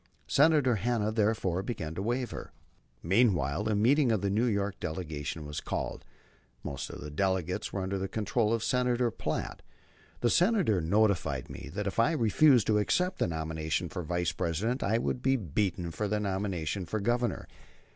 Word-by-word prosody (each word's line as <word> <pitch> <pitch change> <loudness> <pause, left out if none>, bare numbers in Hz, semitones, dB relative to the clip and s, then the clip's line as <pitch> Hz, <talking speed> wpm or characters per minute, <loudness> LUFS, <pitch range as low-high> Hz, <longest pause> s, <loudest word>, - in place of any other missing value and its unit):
Senator 145 -5 +4
Hanna, 110 0 0
therefore, 105 -5 +1
began 90 -7 -4
to 90 - -4
waver. 120 +4 -3 0.5
Meanwhile 95 - +2
a 110 - +2
meeting 125 +5 +4
of 110 -4 +1
the 100 -1 0
New 110 +5 +2
York 100 -3 -1
delegation 80 -2 -4
was 75 0 -5
called. - - -4 0.6
Most 70 - -5
of - - -8
the 75 - -7
delegates 90 +1 -1
were 95 - -2
under 95 +1 -2
the 95 - -2
control 110 +2 0
of 115 -1 0
Senator 125 -1 +1
Platt. - - -4 0.6
The 120 - +3
Senator 180 - +3
notified 85 - +1
me - - -8
that 105 0 -2
if 100 +2 -2
I 145 +8 +4
refused 125 -2 +4
to 105 -1 +3
accept 180 - 0
the - - +2
nomination 80 +1 -2
for 90 - -4
Vice 85 -1 -1
President 100 - -1
I 110 +3 +2
would 125 +1 -2
be 135 +1 +3
beaten 90 - -1
for 105 +6 -2
the 105 +1 0
nomination 95 -3 -2
for 110 - -2
Governor. 120 +1 -1
105 Hz, 170 wpm, -30 LUFS, 85-120 Hz, 0.6 s, Senator